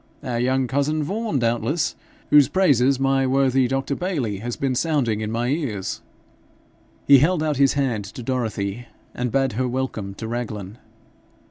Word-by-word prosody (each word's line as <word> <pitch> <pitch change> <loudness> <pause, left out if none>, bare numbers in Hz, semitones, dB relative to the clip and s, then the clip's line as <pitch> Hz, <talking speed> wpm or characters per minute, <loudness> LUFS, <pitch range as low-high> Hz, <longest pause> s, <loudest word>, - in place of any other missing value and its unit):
Our 120 -2 -2
young 130 +2 +1
cousin 145 +4 0
Vaughan, 210 +1 -2
doubtless, 120 +7 0 0.4
whose 145 -2 +7
praises 140 -8 +3
my 135 0 +2
worthy 135 -1 +2
Dr. 135 +2 -1
Bayly 140 - -2
has 120 +3 -4
been 135 -2 -1
sounding 125 -6 0
in 105 - -3
my 120 +2 -1
ears?' 130 - -3 1.0
He 140 -1 +8
held 160 +3 +2
out 150 -3 0
his 140 -1 +4
hand 125 -8 -1
to 120 +5 -9
Dorothy, 115 -3 -3 0.3
and 125 -1 -2
bade 135 -2 +1
her 125 +4 -1
welcome 120 -6 -3
to 110 - -6
Raglan. 110 -3 -5
130 Hz, 155 wpm, -22 LUFS, 115-140 Hz, 1.0 s, He